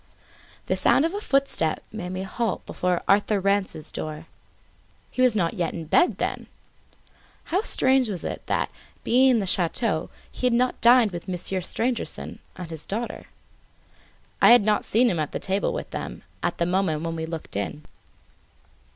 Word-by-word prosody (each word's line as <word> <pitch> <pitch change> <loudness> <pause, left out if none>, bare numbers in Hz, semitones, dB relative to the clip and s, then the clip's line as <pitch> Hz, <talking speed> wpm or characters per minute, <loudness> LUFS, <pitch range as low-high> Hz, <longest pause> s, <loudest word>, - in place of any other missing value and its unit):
The - - 0
sound 295 - +4
of 330 - -1
a 410 - -3
footstep 275 - +1
made 200 -5 -5
me 185 +1 -4
halt 225 +2 -2
before 180 -1 -1
Arthur 205 +1 +3
Rance's 195 -5 0
door. 155 +1 -6 0.9
He 255 - -2
was 250 -3 +4
not 170 -5 +1
yet 170 -3 -2
in 165 -2 -5
bed, 345 - +3
then! - - -3 1.1
How 370 - +4
was 260 - +1
it - - -5
that, - - 0 0.3
being 260 +3 +4
in 250 - +4
the 205 - 0
chateau, 185 0 0 0.2
he 250 - -1
had 245 - +2
not 250 +1 +1
dined 235 -2 +6
with 175 +1 -7
Monsieur 185 +1 -2
Stangerson 235 +6 -2 0.2
and 180 -3 -8
his 160 -1 -7
daughter? 230 +4 -4 1.2
I - - +8
had 240 -4 +5
not 215 -1 +2
seen 240 +4 +3
him 175 -8 0
at 150 - -2
table 195 +1 -1
with - - -5
them, - - -6 0.2
at - - -1
the 170 - +1
moment 175 -4 0
when 165 0 -3
we 160 0 -4
looked 160 -8 -7
in. 100 +10 -4
195 Hz, 170 wpm, -25 LUFS, 170-240 Hz, 1.2 s, I